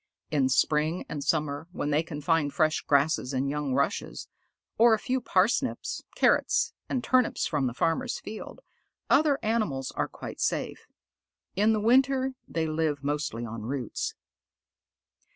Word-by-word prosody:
In 140 -4 +2
spring 150 +5 +1
and 145 - -5
summer, 150 0 -1
when 150 -5 -3
they 150 +2 +3
can 155 -3 -7
find 160 -2 +1
fresh 155 +1 +1
grasses 140 -2 +1
and 130 +1 0
young 145 -3 -2
rushes, 140 +9 -1 0.5
or 230 -1 +7
a - - -3
few 255 +4 -2
parsnips, 225 +5 0
carrots, - - +2 0.2
and 255 -2 -1
turnips 255 0 +2
from 135 - 0
the 120 - -3
farmers' 205 - 0
fields, 215 +1 -8 0.5
other 295 -2 +4
animals 210 - -1
are - - -2
quite - - -8
safe. - - -2 0.7
In 210 +3 +3
the 215 - +1
winter 260 +4 +3
they 165 -1 -1
live 155 -2 -1
mostly 140 -5 -2
on 115 -1 -6
roots. 125 +1 -3
155 Hz, 145 wpm, -28 LUFS, 140-220 Hz, 0.7 s, or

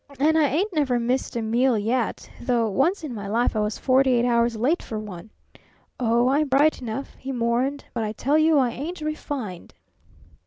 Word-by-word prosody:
And 310 +3 +3
I 310 -2 +4
ain't 360 +9 -1
never 270 -6 +1
missed 245 +2 -1
a 235 - -1
meal 235 +2 +2
yet 230 +3 -1
though 240 -2 +1
once 330 - +1
in 290 -5 -5
my 205 -3 -6
life 230 +3 +1
I - - +1
was 210 0 -1
forty 260 0 +3
eight 240 0 +2
hours 235 -1 +2
late 265 +10 +1
for 220 - -6
one! 210 -2 -8 0.7
Oh, 240 0 +2
I'm 295 +3 +2
bright 280 +3 +3
enough," 245 +3 -5
he 270 - -5
mourned, 250 +3 -1
"but 230 - -2
I 210 - -2
tell 280 +8 +1
you 315 0 +4
I 255 -3 +2
ain't 315 +7 -6
refined." 285 - -5
250 Hz, 195 wpm, -24 LUFS, 230-285 Hz, 0.7 s, I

